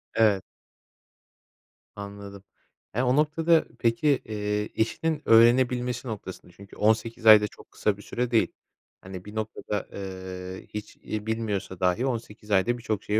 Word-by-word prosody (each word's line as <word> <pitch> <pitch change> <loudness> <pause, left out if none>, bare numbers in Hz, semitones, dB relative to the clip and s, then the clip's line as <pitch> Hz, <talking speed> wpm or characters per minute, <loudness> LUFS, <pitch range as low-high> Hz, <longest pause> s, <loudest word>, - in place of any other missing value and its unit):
Evet. 105 -4 +4 1.5
Anladım. 100 -1 -9 0.5
Ya, 125 +2 +1
o 125 - +3
noktada 155 +2 +3
peki, 115 +6 +1 0.2
eee, 105 -1 -2
eşinin 150 +7 0
öğrenebilmesi 125 +2 +4
noktasında 100 -5 -7
çünkü 100 +3 -15
18 110 +2 +1
ay 110 -1 +10
da 105 - 0
çok - - -17
kısa 105 -2 0
bir - - -12
süre 120 +3 -3
değil. 115 - +4 0.5
Hani, 95 -1 -9
bir 105 +1 -10
noktada, 105 -1 -3
eee, 95 -1 -7
hiç 105 0 -7
iyi 105 -1 -4
bilmiyorsa 105 -5 -3
dahi 90 +7 +1
18 110 -4 -5
ayda 100 +5 +3
birçok 110 -4 -3
şeyi 105 +1 +1
110 Hz, 140 wpm, -26 LUFS, 100-120 Hz, 1.5 s, ay